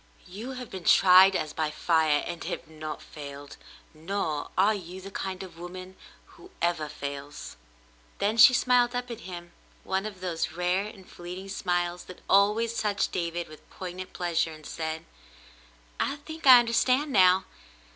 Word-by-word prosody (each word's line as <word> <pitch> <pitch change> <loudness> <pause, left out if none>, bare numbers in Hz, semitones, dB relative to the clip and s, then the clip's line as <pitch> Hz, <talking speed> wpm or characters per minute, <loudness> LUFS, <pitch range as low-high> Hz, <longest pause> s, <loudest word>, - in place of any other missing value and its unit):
'* - - -28
"You 215 +8 -7
have 250 -2 -8
been 185 -2 -7
tried 190 +1 +7
as 155 -3 -2
by 155 -1 -1
fire 155 -1 +2
and 175 -1 -6
have - - -5
not 155 -1 -7
failed 140 -1 -10 0.2
— - - -30
nor 160 -2 -3
are 200 +4 +4
you 185 -2 -7
the 195 +1 -10
kind 190 -1 -4
of 170 -3 -12
woman 185 +1 -9 0.3
who 370 - -17
ever 170 -3 0
fails." 145 0 -7 0.6
Then 210 +2 0
she 230 - +10
smiled 245 0 +3
up 245 0 -3
at 230 - -6
him 175 -1 -8 0.3
one 190 +2 -1
of 200 -3 -9
those 175 -3 -3
rare 180 +3 0
and 195 -3 -13
fleeting 180 +2 -9
smiles 175 -2 -2
that 185 - -12
always 215 +4 +3
touched 205 -2 0
David 170 -1 -3
with 155 0 -15
poignant 185 0 -7
pleasure, 165 -2 -1
and 155 -1 -13
said: 160 0 -5 0.9
"I - - 0
think 315 +1 -7
I 255 -1 +11
understand 255 +4 +2
now. 185 -3 +5
185 Hz, 165 wpm, -27 LUFS, 165-205 Hz, 0.9 s, I